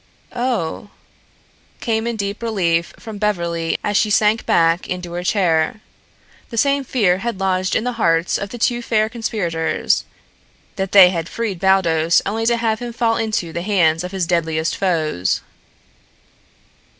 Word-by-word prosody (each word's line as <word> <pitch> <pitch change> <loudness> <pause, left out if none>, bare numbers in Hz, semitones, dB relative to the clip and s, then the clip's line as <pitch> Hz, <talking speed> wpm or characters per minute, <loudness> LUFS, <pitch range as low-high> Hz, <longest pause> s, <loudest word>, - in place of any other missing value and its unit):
"Oh," 240 -7 -2 0.9
came 225 0 -1
in 235 - -2
deep 200 +1 -4
relief 175 -7 0
from 220 -3 -9
Beverly 170 -5 -1
as 205 - -1
she 210 - +3
sank 215 +1 +2
back 165 +1 +2
into 180 -1 -4
her 175 - -3
chair. 180 0 +1 0.7
The 230 - -7
same 280 +3 +2
fear 200 -8 +1
had 230 -2 -4
lodged 185 -1 0
in - - +1
the 250 - -1
hearts 165 0 +2
of 200 - -5
the 240 - -7
two 240 +1 0
fair 220 -2 +1
conspirators 205 -9 -1 0.7
that 190 -1 -3
they 190 -3 +8
had 165 -2 -3
freed 215 -6 -3
Baldos 170 -4 +3
only 225 +3 -1
to 235 0 +3
have 225 -2 0
him 240 -1 -6
fall 230 -1 +1
into 215 -7 -2
the 170 - -3
hands 170 -4 +2
of 180 - -5
his 190 -3 -1
deadliest 165 -2 0
foes. 155 - 0
195 Hz, 155 wpm, -19 LUFS, 170-225 Hz, 0.9 s, they